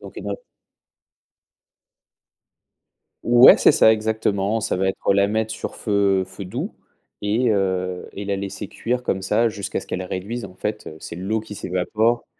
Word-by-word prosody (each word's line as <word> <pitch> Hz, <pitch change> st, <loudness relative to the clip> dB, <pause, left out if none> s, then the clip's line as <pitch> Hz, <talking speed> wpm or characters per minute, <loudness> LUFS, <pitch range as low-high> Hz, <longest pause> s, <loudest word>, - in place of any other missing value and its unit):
donc -, -, -12 dB
une, -, -, -5 dB
heu -, -, -4 dB, 2.9 s
Ouais 120 Hz, +1 st, +8 dB
c'est -, -, +5 dB
ça 110 Hz, -, +6 dB
exactement, 110 Hz, -1 st, 0 dB
ça 110 Hz, -, -1 dB
va 95 Hz, +1 st, 0 dB
être, 95 Hz, -, -2 dB
heu, -, -, +7 dB
la 100 Hz, 0 st, +3 dB
mettre 110 Hz, +1 st, -1 dB
sur -, -, -6 dB
feu 100 Hz, -2 st, +1 dB
feu 95 Hz, +1 st, -9 dB
doux 90 Hz, -, -4 dB, 0.5 s
et 110 Hz, +4 st, +1 dB
heu, 95 Hz, -3 st, -1 dB
et 100 Hz, -, -6 dB
la 100 Hz, 0 st, -1 dB
laisser 100 Hz, 0 st, -5 dB
cuire 125 Hz, +1 st, -2 dB
comme 95 Hz, -5 st, -1 dB
ça 115 Hz, +4 st, +2 dB
jusqu'à 100 Hz, -3 st, -4 dB
ce -, -, -14 dB
qu'elle 95 Hz, -, -3 dB
réduise. 100 Hz, +6 st, -5 dB
En -, -, -10 dB
fait, 105 Hz, +3 st, -4 dB
heu, 80 Hz, -, -8 dB
c'est 85 Hz, -, -8 dB
l'eau 105 Hz, +5 st, -1 dB
qui 105 Hz, -2 st, -9 dB
s'évapore 110 Hz, +6 st, 0 dB
100 Hz, 175 wpm, -22 LUFS, 95-110 Hz, 2.9 s, Ouais